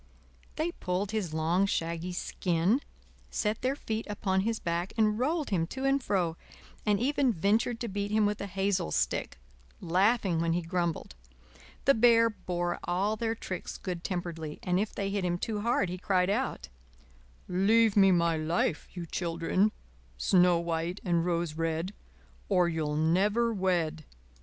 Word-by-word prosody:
They 320 +3 -1
pulled 190 - -2
his 210 -7 -2
long, 165 +5 +1
shaggy 170 0 -2
skin, 180 - 0 0.5
set 210 +1 -1
their 260 +2 0
feet 220 -5 -4
upon 190 -2 0
his 225 +2 -1
back 170 +2 -2
and 215 -1 +2
rolled 300 +2 0
him 165 -4 +1
to 265 +7 -4
and 275 0 +3
fro, 175 -8 0 0.5
and 205 -1 +3
even 275 +1 +2
ventured 220 +5 +1
to 235 - -2
beat 200 0 -3
him 215 0 +3
with 205 0 -1
a 200 - -3
hazel 195 - 0
stick, - - -1 0.4
laughing 190 0 +2
when 165 0 +1
he 175 0 -1
grumbled. 170 -1 -2 0.7
The 275 - +6
Bear 230 -1 +5
bore 175 -4 -3
all 195 +5 0
their 225 +1 -1
tricks 185 -4 -6
good 180 -2 -5
temperedly, 170 -4 -4
and 180 0 +1
if 210 +1 -1
they 195 0 -3
hit 200 -1 -1
him 175 -1 0
too 210 +3 -3
hard 225 -3 +1
he 180 +1 -5
cried 185 0 +2
out: 240 - -2 0.8
"Leave 210 +4 +3
me 195 -2 +6
my 170 -2 +3
life, 160 0 0
you 175 - -4
children, 170 +5 0 0.5
Snow 180 - +4
White 170 +2 -2
and 170 -2 +2
Rose 170 -2 -1
Red, 165 +3 -2 0.6
Or 180 -3 +4
you'll 155 -3 -1
never 200 +9 +2
wed." 175 -5 0
185 Hz, 160 wpm, -29 LUFS, 170-215 Hz, 0.8 s, The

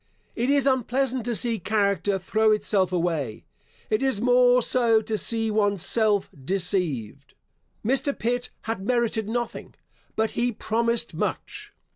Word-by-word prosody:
It 240 +3 -1
is 280 -1 +3
unpleasant 260 -1 0
to 240 -1 -1
see 230 -1 0
character 200 0 0
throw 215 +3 +1
itself 200 -3 +1
away. 165 -10 -2 0.5
It 215 - +1
is 265 -6 +1
more 245 +1 +4
so 230 -3 +3
to 220 0 -3
see 225 +1 +1
one's 205 -4 +1
self 210 -2 +2 0.2
deceived. 145 - -2 0.5
Mr. 270 +4 0
Pitt 245 +2 -2
had 225 -3 -4
merited 225 -2 0
nothing, 240 +1 -4 0.4
but 220 0 0
he 245 +1 0
promised 235 +2 -1
much. 420 0 -4
220 Hz, 135 wpm, -25 LUFS, 200-245 Hz, 0.5 s, more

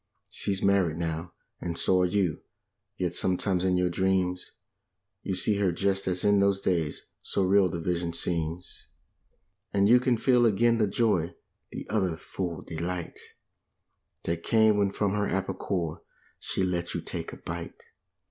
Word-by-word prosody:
She's 95 -1 -2
married 95 -5 +3
now, 85 +1 -3 0.3
and 85 -1 -4
so 95 -1 +3
are 90 - +3
you, 90 -3 0 0.6
yet 90 -2 -1
sometimes 90 0 0
in 90 -1 +2
your 90 -1 +1
dreams 95 0 0 0.7
You 95 - -2
see 100 +3 +1
her 100 -3 +2
just 95 +2 0
as 90 -1 0
in 100 -1 +5
those 100 0 +3
days, 85 -6 -1 0.2
so 100 - -1
real 95 0 +4
the 85 - -4
vision 85 0 -1
seems, 85 0 -3 0.8
And 100 0 +3
you 120 +3 +7
can 125 -1 +2
feel 120 0 +4
again 115 +2 +3
the 105 - +3
joy, 100 -5 +1 0.4
the - - -6
utter, 95 -6 0
full 85 -1 -5
delight 85 +1 -4 0.4
\ - - -54
' - - -51
That 85 0 -2
came 110 0 +4
when 100 -1 +3
from 100 0 0
her 105 0 0
apple 95 +1 -1
core 85 -5 -3 0.4
she - - -1
let 85 -2 -1
you - - -2
take - - -5
a - - -9
bite. 85 0 -7
95 Hz, 165 wpm, -28 LUFS, 85-100 Hz, 0.8 s, you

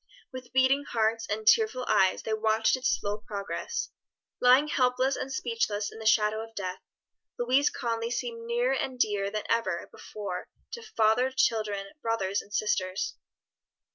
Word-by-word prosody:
With 255 -1 -9
beating 260 +2 +3
hearts 225 -2 0
and 215 +1 -2
tearful 430 - +4
eyes 190 -1 +3
they 220 - -2
watched 220 +1 +2
its 260 - 0
slow 205 +1 -3
progress. 200 -2 -4 0.5
Lying 255 +4 +6
helpless 255 -1 +2
and 270 - -5
speechless 230 -5 -1
in - - -11
the 220 - -2
shadow 215 0 +3
of 225 0 -13
death, 185 -2 -4 0.6
Louise 255 +4 +3
Conly 230 -2 -2
seemed 235 -1 -4
nearer 240 +2 +1
and 260 -1 -2
dearer 205 -3 +1
than 215 +1 -3
ever 190 -7 0
before 195 -4 -6 0.2
to 470 - -6
father, 230 - +2
children, 215 -6 0
brothers 200 -4 0
and 205 - -19
sisters. 195 -2 -1
225 Hz, 150 wpm, -28 LUFS, 210-255 Hz, 0.6 s, Lying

